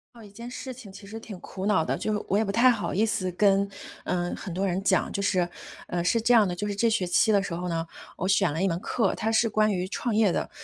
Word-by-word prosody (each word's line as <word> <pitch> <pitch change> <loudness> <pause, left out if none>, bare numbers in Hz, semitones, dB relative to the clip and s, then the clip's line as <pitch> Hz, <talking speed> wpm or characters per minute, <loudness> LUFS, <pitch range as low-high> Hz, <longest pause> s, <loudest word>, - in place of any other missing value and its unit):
到 230 - -13
一 205 - -12
件 235 +4 -9
事 260 +1 -7
情 230 -6 -12
其 200 - -12
实 220 +3 -8
挺 205 -5 -9
苦 190 0 -7
恼 205 -6 +3
的， - - -1
就， 210 -1 -2
我 200 - +1
也 220 - +2
不 200 - -2
太 250 +5 +5
好 215 -4 -2
意 215 +4 +2
思 185 -4 -1
跟， 200 +1 +3 0.3
呃， 175 0 -1
很 180 - -7
多 190 +2 -1
人 185 0 -1
讲。 190 -2 +2
就 200 - -2
是， 185 -3 +1 0.4
呃， 175 -1 -2
是 230 +6 +2
这 245 - +3
样 220 -4 +6
的， 175 - -3
就 205 +3 -3
是 205 - -3
这 230 +3 +2
学 205 -5 +1
期 200 +5 +3
的 200 -2 +4
时 170 - -5
候 180 +1 -3
呢， 165 -1 -2 0.3
我 185 - -2
选 195 -3 +3
了 160 +4 -3
一 - - +3
门 170 -2 -1
课， 205 0 0
它 220 +1 -1
是 225 +1 +3
关 215 0 +2
于 180 0 -2
创 225 +3 -2
业 215 -3 +4
的。 - - -2
200 Hz, 305 characters per minute, -26 LUFS, 185-220 Hz, 0.4 s, 样